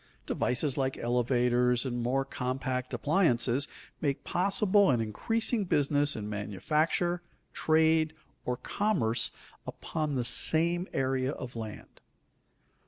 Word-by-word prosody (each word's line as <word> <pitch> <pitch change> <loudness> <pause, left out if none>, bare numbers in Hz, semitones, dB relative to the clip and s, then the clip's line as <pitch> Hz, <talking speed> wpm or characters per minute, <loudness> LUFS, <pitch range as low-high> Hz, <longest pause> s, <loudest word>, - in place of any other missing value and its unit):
Devices 130 +3 -1
like 135 0 -1
elevators, 125 +1 +1
and 120 -2 -2
more 135 +3 0
compact 130 0 -3
appliances, 140 -5 +2 0.3
make 140 -3 -1
possible 200 +2 +2
an 125 -4 +3
increasing 220 - 0
business 145 -4 +2
in 105 -2 -5
manufacture, 150 - -1 0.3
trade, 160 0 +2 0.3
or 125 0 -2
commerce 120 - 0 0.4
upon 155 -3 -3
the 125 - 0
same 170 +8 +3
area 130 0 0
of 125 -4 -8
land. 110 -2 -8
135 Hz, 105 wpm, -29 LUFS, 125-160 Hz, 0.4 s, an